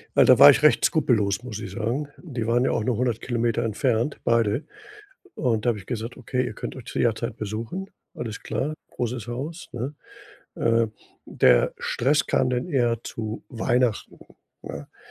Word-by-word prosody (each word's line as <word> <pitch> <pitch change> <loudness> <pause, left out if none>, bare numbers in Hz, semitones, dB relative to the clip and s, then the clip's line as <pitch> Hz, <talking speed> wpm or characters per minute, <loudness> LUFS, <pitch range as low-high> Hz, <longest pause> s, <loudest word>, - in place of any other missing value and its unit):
Weil, - - +7
da - - +6
war - - +11
ich - - +5
recht - - +5
skrupellos, 105 -1 +2
muss 110 -4 -6
ich - - -6
sagen. 120 +6 -2
Die 130 -10 -5
waren 120 +3 +2
ja - - +2
auch 110 - 0
nur 115 0 0
100 120 -2 0
Kilometer 120 -1 0
entfernt 115 +4 0
beide. 115 +2 +2 0.7
Und 115 -6 0
da - - +1
habe 115 -3 +1
ich 95 - -12
gesagt: 115 -1 -4
„Okay, 125 0 -2
ihr 120 - -4
könnt - - -6
euch 130 - -9
zu - - -5
jederzeit 115 0 0
besuchen.“ 115 - -5 0.3
Alles 115 -2 -5
klar, 150 +3 -2 0.2
großes 120 -1 -4
Haus, 145 +9 -5
ne? 125 +4 -4 0.6
Äh, 115 0 +2 0.4
der 60 -1 +4
Stress 140 +4 +1
kam 130 - +2
dann 125 0 -1
eher 120 -8 +1
zu 110 -1 -5
Weihnachten, 120 -1 0 0.4
ne? 70 +1 -7
Äh, - - -34
120 Hz, 180 wpm, -25 LUFS, 110-125 Hz, 0.7 s, war